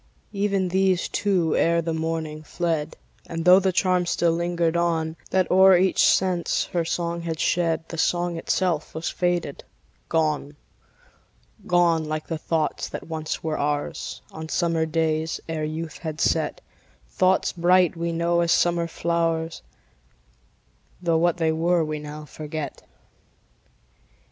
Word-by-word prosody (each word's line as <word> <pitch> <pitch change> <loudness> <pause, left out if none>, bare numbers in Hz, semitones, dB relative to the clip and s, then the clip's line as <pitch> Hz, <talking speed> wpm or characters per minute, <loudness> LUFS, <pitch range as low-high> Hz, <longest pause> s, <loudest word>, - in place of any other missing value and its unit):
Even 200 -2 0
these, 190 -1 +2
too, 180 -6 +1
ere 170 0 +3
the 165 0 -2
morning, 160 -1 -3
fled; 160 -1 -2 0.3
And, 165 0 -4
tho' 180 +1 +8
the 190 -1 +1
charm 180 -1 +1
still 170 -1 +2
lingered 170 0 0
on, 165 -2 0
That 185 -1 +1
o'er 190 0 +7
each 185 +1 +3
sense 185 -2 +2
her 170 -1 +1
song 170 +1 -2
had 165 -2 -4
shed, 165 -2 0
The 165 - -6
song 175 +1 +1
itself 165 -2 -1
was 160 +1 -2
faded, 175 -5 -1 0.5
gone; 155 -2 0 1.1
Gone, 170 -2 +3
like 155 0 -3
the 165 -2 -4
thoughts 160 -1 -1
that - - -7
once 155 -1 -4
were 160 -1 -2
ours, 145 0 -3
On 160 0 -8
summer 165 -2 0
days, 160 0 0
ere 160 -2 -2
youth 160 +1 -5
had 155 -2 -5
set; 160 -2 0 0.5
Thoughts 185 0 +2
bright, 180 0 +3
we 170 0 -2
know, 170 +1 +1
as 170 -1 +1
summer 170 -1 +2
flowers, 165 -1 -1 1.4
Tho' 170 -2 +1
what 175 +1 +2
they 160 -2 +1
were 165 +1 +1
we 155 0 -4
now 150 +1 -8
forget. 150 -1 -6
165 Hz, 140 wpm, -24 LUFS, 160-175 Hz, 1.4 s, tho